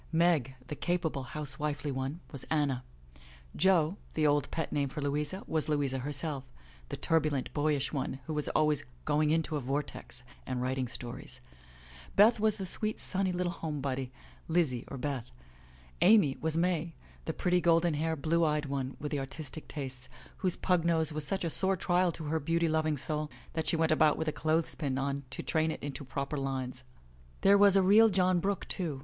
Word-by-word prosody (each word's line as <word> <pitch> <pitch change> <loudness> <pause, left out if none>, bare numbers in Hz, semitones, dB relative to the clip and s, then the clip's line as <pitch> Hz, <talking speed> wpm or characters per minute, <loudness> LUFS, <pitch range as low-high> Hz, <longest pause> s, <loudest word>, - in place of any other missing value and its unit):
Meg, 160 -6 +2
the - - -6
capable 170 -4 -1
house 140 +1 -5
wifely 150 -1 -2
one, 135 +5 -3
was 140 -5 -5
Anna; 145 -5 0 0.7
Jo 180 0 +3 0.2
(the 155 - +2
old 145 0 +2
pet 160 - -3
name 140 -2 0
for 140 - -6
Louisa) 150 +6 -2
was 155 -1 -1
Louisa, 140 -3 0
herself, 140 +1 0 0.5
the - - -4
turbulent, 155 -5 0
boyish 145 -2 0
one, 135 -1 -2
who 160 - -4
was 150 -1 -1
always 150 -2 +2 0.2
''going 150 0 +2
into 160 0 +1
a - - -3
vortex" 135 -1 -4 0.2
and 130 -1 -3
writing 130 0 -1
stories; 120 +1 -8 0.8
Beth 220 +3 +6
was 215 -1 +4
the 195 -3 -5
sweet, 215 +4 -2
sunny 190 0 -1
little 180 0 -1
home 160 -3 -4
body, 130 -2 -3 0.4
Lizzie 155 -8 +1
or 140 - -6
Beth; 130 -2 -3 0.7
Amy 190 -10 +6
was 160 0 0
May, 170 -2 0 0.3
the - - -1
pretty, 180 +1 +1
golden 165 0 +3
haired, 155 -1 -2
blue 165 +1 +2
eyed 150 -1 +1
one, 135 -1 -3
with 150 - -4
the 145 - 0
artistic 150 +3 -7
tastes, 130 -4 -7 0.3
whose 185 -2 0
pug 180 -3 +1
nose 160 -2 +1
was 150 -1 0
such 190 +2 -1
a 170 - 0
sore 190 +2 +1
trial 180 0 +2
to 165 - -7
her 155 +2 -1
beauty 165 +3 +1
loving 155 -1 +1
soul 150 +2 -2 0.2
that 160 - -2
she - - +2
went 160 -1 +2
about 155 -1 +4
with 160 - -2
a - - +2
clothespin 155 -3 -1
on 140 +1 -1
it 140 -2 -12
to - - -4
train 160 -1 +1
it - - -5
into 145 0 -5
proper 140 +2 -3
lines. 130 -2 -3 0.6
There 200 +1 +6
was 200 -1 +7
a 195 - +5
real 215 +4 +7
John 185 -2 +3
Brooke, 200 +2 -2
too. 160 -7 -3
155 Hz, 190 wpm, -31 LUFS, 140-170 Hz, 0.8 s, was